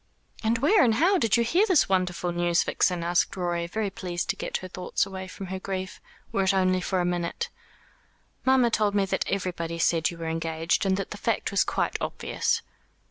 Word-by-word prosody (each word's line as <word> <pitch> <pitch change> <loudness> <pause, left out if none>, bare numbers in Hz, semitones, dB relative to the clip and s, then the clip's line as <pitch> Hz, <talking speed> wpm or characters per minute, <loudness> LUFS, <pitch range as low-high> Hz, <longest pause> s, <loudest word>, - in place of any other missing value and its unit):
"And 225 +1 +2
where 315 - +4
and 225 -4 +3
how 365 - +3
did 225 -6 +3
you 235 - +3
hear 355 - +3
this 370 -7 +4
wonderful 180 -2 0
news, 175 0 +2
Vixen?" 180 -2 +1
asked 175 +3 +1
Rorie, 175 -1 -1
very 205 +2 -2
pleased 175 -2 -3
to - - -7
get - - -3
her 185 - -8
thoughts 180 +1 -1
away 190 -1 -7
from 195 +1 -8
her 190 - -3
grief, 190 0 -5 0.3
were 195 - +1
it 190 0 +2
only 185 -1 +2
for 185 0 0
a - - 0
minute. 175 - -2 0.9
"Mamma 260 -3 +4
told 210 -2 +1
me 200 -1 +3
that 190 - -1
everybody 175 -3 -2
said 165 -1 +2
you 170 - -8
were 165 - -6
engaged, 165 +3 0
and 190 0 +2
that 195 - -4
the - - -5
fact - - -1
was - - +3
quite - - -1
obvious." - - -1
185 Hz, 205 wpm, -26 LUFS, 175-215 Hz, 0.9 s, where